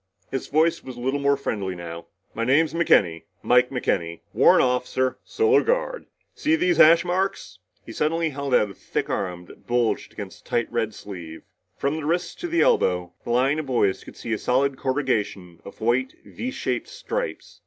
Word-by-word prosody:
His 135 - -3
voice 160 +3 +2
was 130 -2 -9
a - - -8
little 130 +3 -1
more 140 0 +2
friendly 100 -8 -3
now. 85 -1 -8 0.3
"My 115 - -2
name's 145 +5 +3
McKenny 95 - +3 0.2
Mike 125 0 +4
McKenny. 85 -10 -2
Warrant - - +6
Officer 125 0 0
Solar 440 -1 +3
Guard. - - -1 0.3
See 310 +1 +1
these 350 +2 +1
hash 165 +2 +7
marks?" 180 - -2 0.3
He - - -9
suddenly 160 +5 0
held 140 -2 -1
out 105 -2 +2
a - - -10
thick - - -4
arm 90 -2 -3
that - - -17
bulged 120 -1 0
against - - -9
the - - -20
tight 120 - 0
red 110 -3 -1
sleeve. 85 -5 -9 0.3
From 140 +3 -1
the 155 - -5
wrists 175 +2 0
to 350 - -2
the 335 0 +1
elbow, 90 -1 +2
the - - -8
lines 130 +5 +2
of 155 - -5
boys 110 -7 +1
could - - -13
see 115 - -4
a 110 - -1
solid 135 +2 +1
corrugation 110 - -2
of 100 - -12
white 125 +3 +1
V 250 - -5
shaped - - -3
stripes. - - -5
130 Hz, 185 wpm, -24 LUFS, 105-160 Hz, 0.3 s, hash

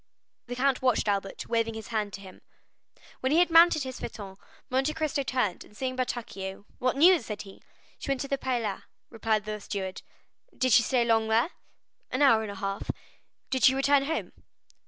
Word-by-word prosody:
The 245 - -5
Count 265 +1 +1
watched 255 -4 +2
Albert, 195 -1 -2
waving 230 -1 0
his 220 - -8
hand 215 -3 -1
to 195 - -7
him. 190 -2 -13 0.8
When 260 - -1
he 310 - +4
had 350 0 +4
mounted 330 -2 +6
his 260 -1 -6
phaeton, 200 -4 -7 0.3
Monte 270 +4 0
Cristo 310 -3 -1
turned, 255 -9 -1
and 210 - -18
seeing 255 -1 -2
Bertuccio, 205 -6 -4
"What 255 +1 0
news?" 335 -3 +5
said 210 -1 -5
he. 195 -1 -14 0.4
"She - - -7
went 270 -2 0
to 275 - -3
the 275 0 -1
Palais," 235 -7 -2 0.3
replied 220 -2 0
the 215 0 -4
steward. 190 -2 -5 0.6
"Did 255 -2 +2
she 235 - +8
stay 240 +1 +1
long 225 -1 +2
there?" 230 +9 +2 0.6
"An 255 +3 +1
hour 230 -6 +6
and 220 - -5
a 200 - -6
half." 195 0 -4 0.6
"Did 260 -1 0
she 260 - +6
return 275 +1 +3
home?" 320 +3 -3
240 Hz, 190 wpm, -28 LUFS, 210-270 Hz, 0.8 s, she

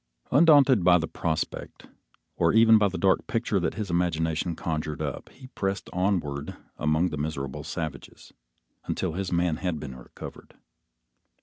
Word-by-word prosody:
Undaunted 140 - +6
by 90 0 +6
the 80 -1 -2
prospect, 80 -1 -4 0.5
or - - +2
even 110 0 +7
by 105 - +4
the 95 - -4
dark 95 -1 +2
picture 110 -3 0
that 85 -2 -2
his 105 -5 -4
imagination 85 -1 0
conjured 75 -2 -3
up, - - -4
he 130 - -15
pressed 95 -5 -3
onward 85 -7 -1 0.2
among 75 +4 +1
the 75 - -5
miserable 75 -1 -4
savages, 80 -3 -7 0.5
until - - -2
his 95 +1 -3
man 85 -2 +1
had 90 -3 -2
been 70 -3 -7
recovered. - - -11
85 Hz, 145 wpm, -26 LUFS, 75-100 Hz, 0.5 s, even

